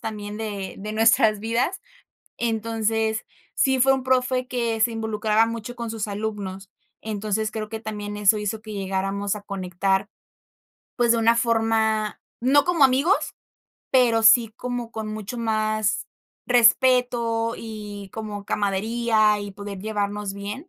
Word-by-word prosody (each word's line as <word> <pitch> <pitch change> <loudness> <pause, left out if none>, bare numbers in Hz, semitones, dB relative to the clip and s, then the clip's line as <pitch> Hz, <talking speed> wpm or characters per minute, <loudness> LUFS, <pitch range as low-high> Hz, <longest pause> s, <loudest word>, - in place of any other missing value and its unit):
también 210 -1 -6
de 205 -3 -5
de 210 +2 -5
nuestras 220 -1 +4
vidas. 235 - -1 0.6
Entonces, 225 -1 -1 0.3
sí 265 -2 +2
fue 270 +2 +5
un 265 -1 -2
profe 255 0 +1
que 235 -3 -1
se 235 +1 +3
involucraba 220 0 +1
mucho 230 +1 -5
con 235 -2 -5
sus 220 -1 -3
alumnos. 200 -2 -5 0.3
Entonces, 215 0 -2
creo 215 -1 -4
que 220 0 -5
también 210 -2 -5
eso 210 +1 +4
hizo 210 +1 -3
que 215 -1 -8
llegáramos 195 +1 -2
a 205 - -7
conectar, 195 0 -1 0.9
pues, 240 -2 +4
de - - +1
una 230 +1 +4
forma 225 -2 +1 0.2
no 280 +3 +4
como 350 -4 +3
amigos, 275 +9 +3 0.6
pero 240 -4 +4
sí 225 0 +6
como 245 -2 -4
con 220 -1 -5
mucho 215 +2 -6
más 215 -2 0 0.4
respeto 240 -1 +3
y 210 -3 -8
como 210 -2 -6
camaradería 215 +2 +1
y 205 0 -6
poder 205 0 -7
llevarnos 205 -1 -2
bien. 205 - -7
220 Hz, 140 wpm, -24 LUFS, 205-235 Hz, 0.9 s, sí